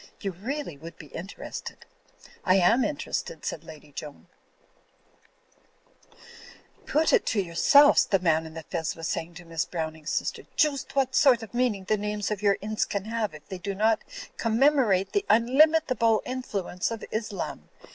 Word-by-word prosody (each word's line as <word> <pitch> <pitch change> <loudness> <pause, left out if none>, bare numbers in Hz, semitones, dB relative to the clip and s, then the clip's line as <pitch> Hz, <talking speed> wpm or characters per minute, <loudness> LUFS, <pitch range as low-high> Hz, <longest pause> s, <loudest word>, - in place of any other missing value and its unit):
You 195 - -3
really 220 - -5
would 165 +3 -11
be 150 - -13
inter 185 +5 -8
ested.'* - - -7 0.6
"I 185 - +4
am 210 +7 +4
interested," 310 +10 -3
said - - -4
Lady 155 -2 -13
Joan. 145 +1 -9 2.6
^Toot 310 +2 +2
it - - +5
to 215 - +1
yourselfs," 280 - +5
the 195 - +4
man 160 -3 +1
in 160 - -12
the 160 - -6
fez 165 +1 -3
was 165 -2 -5
say - - -1
ing 165 +1 -14
to 175 +1 -11
Miss 165 -1 -2
Browning's 160 -2 -5
sister, - - -2
"joost 290 -4 +1
what 265 -1 +1
sort 255 -5 +5
of 215 - -10
meaning 240 -5 0
the 215 +3 +1
names 210 0 -3
of 210 -1 -2
your 200 -1 +3
ince 215 +1 -1
can 200 -1 -3
have 220 -6 -2
if 155 - -14
they 190 - -6
do 195 +2 -4
not 220 +2 +2 0.4
commemorate 230 -5 +3
the 405 - +1
unlimitable 255 -1 +4
influence 205 -8 -3
of 230 -1 -5
Islam. 215 -2 -4
210 Hz, 165 wpm, -27 LUFS, 170-250 Hz, 2.6 s, it